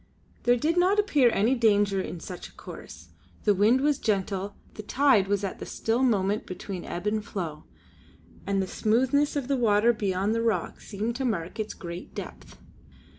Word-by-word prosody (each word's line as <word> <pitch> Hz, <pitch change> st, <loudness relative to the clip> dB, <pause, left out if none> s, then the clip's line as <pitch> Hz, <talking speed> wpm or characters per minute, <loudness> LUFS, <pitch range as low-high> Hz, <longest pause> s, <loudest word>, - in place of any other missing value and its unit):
There 245 Hz, 0 st, +5 dB
did 320 Hz, +8 st, 0 dB
not 370 Hz, +3 st, +4 dB
appear 300 Hz, -, +4 dB
any 225 Hz, +5 st, +2 dB
danger 205 Hz, -5 st, +3 dB
in 180 Hz, -, -6 dB
such 180 Hz, +2 st, -8 dB
a -, -, -20 dB
course; -, -, -11 dB, 0.3 s
the 210 Hz, -, +4 dB
wind 215 Hz, +7 st, +4 dB
was 290 Hz, 0 st, +2 dB
gentle, 200 Hz, -1 st, -1 dB, 0.2 s
the -, -, -7 dB
tide 240 Hz, -3 st, +3 dB
was 200 Hz, 0 st, 0 dB
at 195 Hz, -, -4 dB
the -, -, -6 dB
still 225 Hz, +3 st, -1 dB
moment 210 Hz, -5 st, +1 dB
between 185 Hz, 0 st, -6 dB
ebb 175 Hz, +3 st, -5 dB
and 210 Hz, 0 st, 0 dB
flow, 165 Hz, -7 st, -5 dB, 0.8 s
and 195 Hz, -1 st, +1 dB
the -, -, -5 dB
smoothness 260 Hz, +10 st, +1 dB
of 280 Hz, -4 st, -2 dB
the 275 Hz, -1 st, +1 dB
water 230 Hz, 0 st, +4 dB
beyond 200 Hz, -1 st, 0 dB
the 230 Hz, -, 0 dB
rock 220 Hz, -7 st, -1 dB
seemed 220 Hz, +3 st, -3 dB
to 270 Hz, -, -2 dB
mark 195 Hz, -2 st, -2 dB
its 215 Hz, 0 st, -3 dB
great 175 Hz, 0 st, -8 dB
depth. -, -, -8 dB
215 Hz, 180 wpm, -27 LUFS, 195-245 Hz, 0.8 s, There